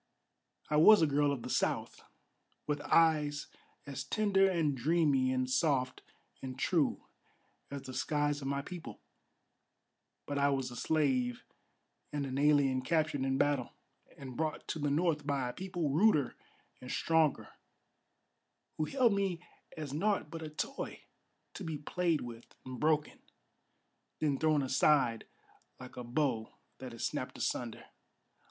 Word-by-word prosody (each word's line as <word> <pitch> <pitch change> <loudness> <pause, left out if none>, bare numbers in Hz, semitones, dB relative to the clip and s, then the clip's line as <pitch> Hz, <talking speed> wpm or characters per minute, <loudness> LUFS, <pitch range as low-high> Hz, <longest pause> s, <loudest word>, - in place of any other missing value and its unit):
I 150 - +1
was 185 +4 +8
a - - +6
girl 145 0 +2
of 135 -4 -3
the - - -6
South, - - -1 0.6
with 145 -1 -2
eyes 150 -3 +3 0.4
as 140 -2 -5
tender 195 +3 +2
And 160 -6 +1
dreamy 140 -1 +2
and 130 0 0
soft 130 -2 +1 0.4
and 130 -1 -6
true 160 +2 +1 0.6
as 140 -1 -6
the 130 -1 -8
skies 145 +2 0
of 135 - -4
my 140 0 -1
people; 175 +1 -8 1.3
But 145 0 -2
I 140 0 +4
was 135 -2 -1
a - - -8
slave 130 -3 0 0.7
and 145 -1 -2
an 135 0 -3
alien 145 -3 +3
captured 155 0 0
in 135 0 0
battle, 140 -3 +1 0.4
And 130 -2 -8
brought 155 +1 -3
to 160 - -2
the 145 -1 0
North 150 -1 +1
by 140 -3 0
a - - -6
people 180 -6 -3
ruder 155 - +3 0.5
and 125 - -9
stronger, 160 -1 +1 1.3
Who 155 - 0
held 250 - +3
me 195 -4 0 0.4
as 150 -3 -5
naught 195 0 0
but 165 - -6
a 155 - -5
toy, 215 - -5 0.5
to 200 - -7
be 160 -3 -3
played 165 +2 0
with 120 -1 -10
and 130 -1 -7
broken, 155 -1 +1 1.0
Then 145 -3 0
thrown 155 -2 +2
aside 130 -3 +2 0.5
like 130 -1 -11
a 125 - -6
bow 120 -2 -1 0.2
that 130 -1 -7
is 115 - -4
snapped - - -4
asunder. - - -3
145 Hz, 145 wpm, -33 LUFS, 130-160 Hz, 1.3 s, was